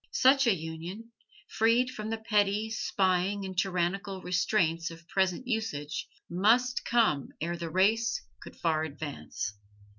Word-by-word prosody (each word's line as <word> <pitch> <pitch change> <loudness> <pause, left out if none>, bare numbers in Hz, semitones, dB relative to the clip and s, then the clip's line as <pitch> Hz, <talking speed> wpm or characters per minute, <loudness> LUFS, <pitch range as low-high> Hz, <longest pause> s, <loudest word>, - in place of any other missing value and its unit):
Such 270 - +5
a 220 - +5
union, 170 +7 -7 0.4
freed 235 +3 +2
from 215 -2 -5
the 225 - -1
petty, 210 -1 +1
spying 195 -1 +1
and 190 -1 -6
tyrannical 190 +1 -1
restraints 170 -2 +1
of 165 0 -12
present 190 +4 0
usage, 155 - -2 0.2
must 230 +8 +2
come 220 - +2
ere 170 +2 -2
the 170 -1 -5
race 220 +6 +2 0.2
could - - -11
far 160 -2 +1
advance. 145 -7 -5
190 Hz, 130 wpm, -29 LUFS, 170-225 Hz, 0.4 s, Such